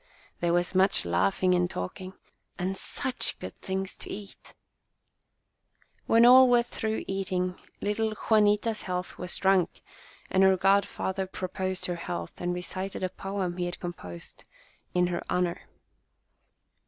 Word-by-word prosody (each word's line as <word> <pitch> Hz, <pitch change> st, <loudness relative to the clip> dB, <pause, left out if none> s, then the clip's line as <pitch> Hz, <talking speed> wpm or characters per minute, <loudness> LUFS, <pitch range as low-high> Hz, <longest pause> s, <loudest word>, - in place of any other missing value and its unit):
There 170 Hz, 0 st, +1 dB
was 175 Hz, +1 st, +1 dB
much 190 Hz, -, +3 dB
laugh 90 Hz, -, +1 dB
ing 185 Hz, 0 st, +5 dB
and 180 Hz, 0 st, +2 dB
talking, 185 Hz, -, -6 dB, 0.4 s
and 185 Hz, +2 st, -2 dB
such 255 Hz, +6 st, 0 dB
good -, -, -8 dB
things 190 Hz, 0 st, -3 dB
to -, -, -8 dB
eat! 200 Hz, 0 st, -9 dB, 1.5 s
When 230 Hz, +1 st, +6 dB
all 255 Hz, +1 st, +9 dB
were 240 Hz, -1 st, +5 dB
through 220 Hz, -2 st, -3 dB
eating, 185 Hz, -2 st, -2 dB, 0.2 s
little 215 Hz, +1 st, 0 dB
Jua 215 Hz, +1 st, +3 dB
nita's 210 Hz, +1 st, +2 dB
health 180 Hz, 0 st, -4 dB
was 180 Hz, -1 st, -3 dB
drunk, 190 Hz, -2 st, +2 dB, 0.5 s
and 190 Hz, -, +3 dB
her 190 Hz, -1 st, +6 dB
godfather 195 Hz, 0 st, +1 dB
pro 185 Hz, 0 st, -5 dB
The -, -, -27 dB
Christening 190 Hz, -2 st, -2 dB
9 -, -, 0 dB
posed -, -, -5 dB
her 175 Hz, -, -2 dB
health, 175 Hz, +1 st, -5 dB
and 175 Hz, 0 st, 0 dB
recited 185 Hz, +2 st, -4 dB
a 185 Hz, -, 0 dB
poem 190 Hz, -2 st, -4 dB
he 180 Hz, -, -1 dB
had 175 Hz, 0 st, -5 dB
composed 90 Hz, -, -8 dB, 0.5 s
in 180 Hz, 0 st, +4 dB
her 175 Hz, -1 st, -2 dB
honour. 180 Hz, -1 st, -1 dB
185 Hz, 155 wpm, -28 LUFS, 180-200 Hz, 1.5 s, all